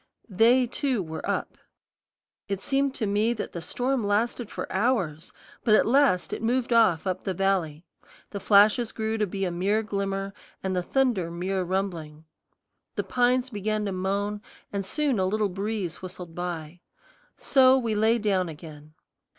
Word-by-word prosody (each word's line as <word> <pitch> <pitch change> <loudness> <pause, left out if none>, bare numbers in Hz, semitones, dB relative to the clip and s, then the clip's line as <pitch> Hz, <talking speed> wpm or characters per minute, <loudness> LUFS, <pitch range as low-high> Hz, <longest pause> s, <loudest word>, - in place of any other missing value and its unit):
They, 235 +6 +4
too, 255 -3 -1
were 160 -1 -7
up. - - -3 0.9
It 195 -1 -2
seemed 275 +4 0
to 225 - -1
me 210 +3 +1
that 215 - -5
the 170 - -6
storm 250 +7 -1
lasted 215 +2 0
for - - -5
hours; 190 -8 0 0.3
but 215 -3 +5
at - - +4
last 245 -7 +3
it - - -4
moved 240 +1 0
off 210 -8 +4
up 185 -1 -2
the 190 -2 -2
valley, 175 -4 0 0.5
the 200 - -4
flashes 210 +4 +4
grew 220 0 -2
to 210 - +1
be 195 +1 -3
a 180 - -2
mere 200 +5 0
glimmer, 195 -1 -3 0.3
and 190 -1 -1
the 180 - +1
thunder 230 -4 0
mere 185 +3 -2
rumbling. 170 -5 -3 0.7
The - - -1
pines 250 +1 +1
began 210 0 -2
to 200 - -2
moan, 200 +2 -2 0.3
and 200 -1 -1
soon 275 +2 0
a 185 - +2
little 210 +1 0
breeze 195 -2 -3
whistled 180 -2 -8
by. 175 -1 -5 0.6
So 260 -1 +5
we 230 -4 -1
lay 220 +2 +3
down 195 -5 0
again. 155 -1 -11
200 Hz, 165 wpm, -26 LUFS, 180-230 Hz, 0.9 s, but